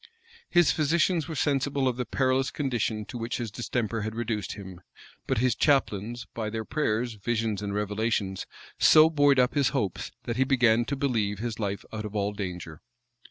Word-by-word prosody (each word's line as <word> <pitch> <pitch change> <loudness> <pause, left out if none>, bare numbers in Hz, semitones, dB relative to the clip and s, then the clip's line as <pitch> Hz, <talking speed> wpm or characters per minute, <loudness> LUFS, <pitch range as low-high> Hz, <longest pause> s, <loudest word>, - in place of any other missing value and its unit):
His 175 -2 +5
physicians 165 +2 +1
were 160 - -5
sensible 140 -1 +1
of 125 - +1
the 125 0 -3
perilous 130 0 +1
condition 120 -6 -2
to 120 - -7
which 115 +1 -3
his 115 -4 -4
distemper 115 -1 -2
had 110 +1 -4
reduced 115 -5 -2
him; 95 -3 -10 0.5
but - - 0
his 125 +1 +3
chaplains, 120 -4 +1
by 110 -2 -3
their 110 0 -4
prayers, 120 -5 -1
visions, 110 -1 -2
and 100 -1 -3
revelations, 105 -2 -1 0.3
so 155 +1 +7
buoyed 145 -3 +4
up 125 -1 +3
his 140 -3 +3
hopes, 100 -7 -2
that 115 0 -3
he 130 - +4
began 120 -3 +3
to 140 - -2
believe 115 -7 0
his 115 +1 -4
life 100 -2 -3
out 110 0 -4
of 105 0 -7
all 100 0 0
danger. 90 -5 -6
115 Hz, 180 wpm, -27 LUFS, 105-135 Hz, 0.5 s, so